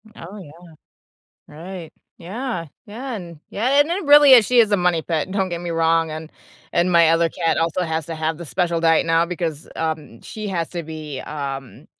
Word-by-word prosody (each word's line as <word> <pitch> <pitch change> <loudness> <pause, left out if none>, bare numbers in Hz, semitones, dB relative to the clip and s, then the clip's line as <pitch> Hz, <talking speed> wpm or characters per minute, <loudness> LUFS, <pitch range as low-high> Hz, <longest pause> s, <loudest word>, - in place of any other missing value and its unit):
Oh, 190 +5 -10
yeah. 165 -7 -11 1.0
Right. 170 +2 -9 0.3
Yeah, 195 +1 -5 0.2
yeah, 245 +4 -6
and 170 -6 -9
yeah, 260 +7 +2
and 300 +3 +2
it 365 0 -2
really 290 -1 +8
is, 235 -4 +7
she 250 -1 +5
is 215 -2 +3
a 205 - +3
money 175 -3 +1
pit, 165 +2 -2
don't 195 -2 0
get 170 -1 -4
me 175 -1 -5
wrong, 165 0 +1
and 155 0 -7 0.4
and 175 +1 +2
my 170 -1 +6
other 165 0 +3
cat 165 -1 -1
also 165 +2 0
has 160 -2 -2
to 165 - -5
have 160 0 -2
the 170 - -8
special 170 +2 -1
diet 165 -1 +3
now, 165 +1 +3
because, 165 -3 -4
um, 155 -7 -4
she 215 -1 -7
has 170 -4 -2
to 175 -2 -4
be, 155 -4 -7
um, 135 -3 -7
170 Hz, 200 wpm, -21 LUFS, 160-195 Hz, 1.0 s, really